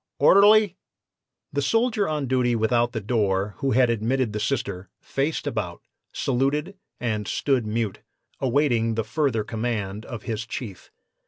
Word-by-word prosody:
"'Orderly!' 205 -1 +6 0.8
"The 140 - 0
soldier 225 - +1
on 150 -2 -1
duty 125 -2 +1
without 120 +2 +2
the 115 - -3
door, 100 -2 0
who 135 - 0
had 125 0 +4
admitted 115 +1 0
the 105 - -2
Sister, 100 -7 -2
faced 140 +4 -2
about, - - -3 0.3
saluted 140 +8 0 0.2
and 110 -4 -2
stood 130 -2 0
mute, 110 -2 -2 0.4
awaiting 125 -4 +1
the 115 - 0
further 135 -6 0
command 110 -2 -3
of 115 -3 -7
his 110 0 -4
chief. 110 -5 -7
120 Hz, 140 wpm, -24 LUFS, 110-140 Hz, 0.8 s, Orderly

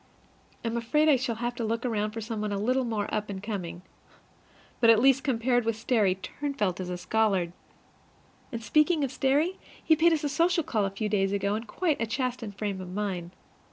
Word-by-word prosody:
I - - +1
am 230 +1 -1
afraid 300 +7 +2
I 295 - +7
shall 250 -2 -1
have 240 +2 -2
to 240 - -4
look 230 +2 -1
about 215 -3 0
for 225 +1 -5
some 220 0 -4
one 210 -1 -2
a 200 - -1
little 255 +5 +1
more 220 -3 -1
up 210 -1 -1
and 200 - -4
coming. 180 -5 -5 1.0
But 230 - +5
at 225 - +8
least, 270 +2 +4
compared 245 -2 +1
with 230 0 0
Sterry, 215 -4 +2
Turnfelt 205 -2 -3
is 180 -1 -4
a 180 - -3
scholar! 185 -2 +1 1.0
And 230 -2 -5
speaking 305 +7 +3
of 270 - -1
Sterry, 295 +8 +1 0.2
he 315 - +5
paid 335 +2 +4
us 315 -2 +1
a 290 - 0
social 335 +4 +2
call 215 -7 0
a - - 0
few 195 +2 -3
days 195 -2 +1
ago, 200 0 0
in 220 +2 -3
quite 310 - -1
a 230 - 0
chastened 245 -4 -3
frame 200 -3 -3
of 180 - -7
mind. 185 -3 -3
225 Hz, 215 wpm, -28 LUFS, 205-265 Hz, 1.0 s, at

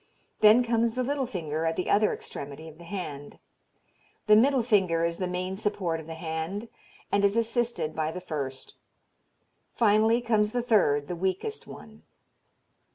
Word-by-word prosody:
Then 220 +3 +7
comes 230 -1 +1
the 255 - 0
little 275 0 -1
finger, 160 -8 -3
at 165 0 0
the 180 - -3
other 210 +1 +3
extremity 145 +3 -7
of 160 0 -13
the - - -11
hand. 160 -6 -6 0.9
The 215 - +6
middle 255 +3 +4
finger 185 -8 +2
is 170 0 -2
the 185 - -1
main 180 +1 -3
support 190 -6 -1
of 160 - -11
the 165 - -6
hand, 160 +7 -4 0.4
and 200 0 +2
is 200 +2 +3
assisted 230 -8 0
by 155 0 -1
the 180 - -6
first. 140 -7 -5 1.0
Finally 220 +1 +3
comes 215 -3 +1
the 245 -1 0
third, 145 -12 +2
the 175 - -4
weakest 190 - -3
one. - - -12
190 Hz, 160 wpm, -27 LUFS, 160-230 Hz, 1.0 s, Then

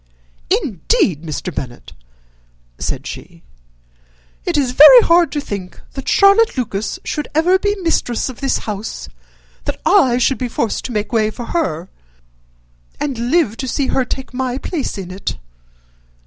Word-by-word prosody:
"Indeed, 195 - +1
Mr. 165 +2 -5
Bennet," 125 -4 -7 0.9
said - - -3
she, - - -9 1.0
"it 345 -3 0
is 270 -4 +1
very 305 - +9
hard 340 -4 +4
to 295 - -2
think 195 -9 -6
that 270 - -5
Charlotte 400 -1 +5
Lucas 215 -4 -2
should 300 - -3
ever 355 +4 +4
be 410 +1 0
mistress 245 -8 0
of 260 0 -8
this 270 -1 +1
house, 210 0 -5 0.6
that - - -3
I 245 -2 +4
should 255 +2 +1
be 250 - -1
forced 225 -1 -2
to - - -4
make 210 +1 -3
way 215 -2 +2
for 235 +2 -7
her, 190 - -1 1.1
and 245 -5 -2
live 280 -9 +2
to 260 - -4
see 265 +2 -1
her 260 - +2
take 260 +1 -6
my 255 0 -2
place 285 - -4
in 185 -2 -6
it!" 190 +1 -4
255 Hz, 150 wpm, -18 LUFS, 210-305 Hz, 1.1 s, very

